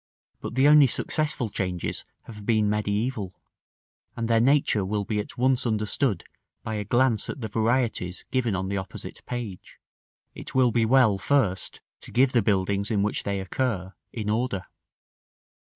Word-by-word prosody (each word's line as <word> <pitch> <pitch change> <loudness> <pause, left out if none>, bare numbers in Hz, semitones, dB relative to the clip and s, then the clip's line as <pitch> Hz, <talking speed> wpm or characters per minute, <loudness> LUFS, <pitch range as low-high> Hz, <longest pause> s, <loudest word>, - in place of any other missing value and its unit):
But - - -6
the 135 +2 +5
only 150 -2 +7
successful 145 -3 -1
changes 90 -3 -3 0.2
have 105 -2 -10
been 110 -1 +2
mediæval; 105 0 -1 0.8
and 115 -1 -2
their 115 0 +3
nature 135 -5 +3
will 100 +2 -1
be 105 0 -1
at 105 - -6
once 130 0 +2
understood 110 +2 0 0.4
by 110 - -4
a 105 -1 -2
glance 120 0 +2
at - - -5
the 110 - -2
varieties 110 -4 0
given 120 -6 +1
on 95 0 -2
the 100 +1 -2
opposite 95 -2 -7
page. 120 -7 -6 0.6
It - - -9
will 130 -2 +4
be 115 0 +2
well 115 -5 +4
first 100 -6 0 0.2
to - - -9
give 130 +1 +3
the 120 - +3
buildings 100 0 0
in 105 -3 +1
which 105 - -1
they 100 -1 -2
occur, 95 -1 -2 0.2
in 110 -3 -5
order. 110 -3 -1
110 Hz, 160 wpm, -26 LUFS, 100-125 Hz, 0.8 s, only